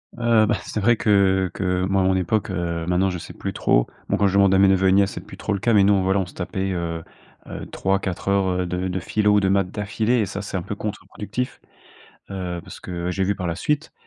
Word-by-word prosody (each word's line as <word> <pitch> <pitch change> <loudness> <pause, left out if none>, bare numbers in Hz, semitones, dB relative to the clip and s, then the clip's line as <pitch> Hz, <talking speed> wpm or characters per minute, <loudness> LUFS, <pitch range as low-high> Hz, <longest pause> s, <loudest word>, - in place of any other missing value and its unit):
Heu, 115 -2 +3
bah - - +1
c'est - - -4
vrai 120 +3 +4
que 95 -4 +2
que 90 -1 -1
moi 95 +1 +1
à 95 - +2
mon 95 - +3
époque, 95 +4 0
heu, 85 -1 -2
maintenant 90 +2 +2
je 90 - -3
sais - - -9
plus - - -4
trop. - - +2 0.2
Bon - - +1
quand 100 - +3
je 95 - -1
demande 100 -1 +5
à - - +5
mes 95 0 +6
neveux 95 0 +3
et - - +5
nièces, 100 0 +3
c'est - - -7
plus - - -11
trop - - -4
le 100 - -2
cas, 115 +3 +1
mais 100 - +6
nous, 100 -1 +4
voilà, 95 +1 +2
on 95 - -1
se 90 - -13
tapait, 95 +1 -3
heu 85 -2 -3 0.4
heu, - - -7
3-4 95 -1 -1
heures, 100 -1 +2
heu, - - -1
de 90 +1 -2
de 95 +1 -2
philo 105 +3 +1
ou - - +5
de 95 - +2
maths 95 -2 +2
d'affilée 110 +4 0
et 110 - +2
ça 100 +2 -5
c'est 100 0 -6
un 90 - -2
peu 105 - -5
contre-productif. 105 +3 -5 0.7
Heu, 90 -2 -4
parce - - -11
que 90 0 -4
j'ai 95 +1 0
vu 100 - +1
par 90 -2 -4
la 85 - -2
suite, 150 - -1
95 Hz, 265 wpm, -22 LUFS, 90-100 Hz, 0.7 s, mes